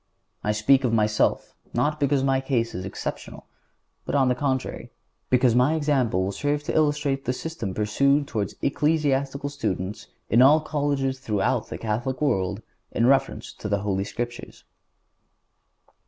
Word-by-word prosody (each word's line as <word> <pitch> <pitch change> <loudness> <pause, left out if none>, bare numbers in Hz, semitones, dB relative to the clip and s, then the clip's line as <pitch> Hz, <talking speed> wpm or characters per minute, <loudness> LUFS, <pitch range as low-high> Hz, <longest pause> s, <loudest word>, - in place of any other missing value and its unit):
I 105 - +1
speak 130 +6 +3
of 125 - +1
myself, 105 -1 +1 0.2
not 150 +6 +1
because 140 -1 +2
my 135 -1 +2
case 125 -4 -1
is 90 +1 -5
exceptional, 95 - -6 0.6
but, - - -3
on 135 -2 +4
the - - +3
contrary, 130 0 -2 0.4
because 125 -1 +4
my 125 +6 +3
example 135 - +1
will 95 - -1
serve 145 +7 -1
to - - -3
illustrate 145 -3 +1
the 125 - 0
system 125 - -5
pursued 140 +7 +2
toward 105 -6 -3
ecclesiastical 140 -2 0
students 100 -8 -4 0.2
in 115 +4 +4
all 145 +4 +7
colleges 140 -3 -1
throughout 105 -7 0
the - - -5
Catholic 120 +4 -2
world 100 -7 0 0.3
in 115 - +1
reference 135 +1 +1
to 105 - -6
the 100 -1 0
Holy 95 -1 -1
Scriptures. 120 +3 -6
130 Hz, 150 wpm, -25 LUFS, 110-140 Hz, 0.6 s, all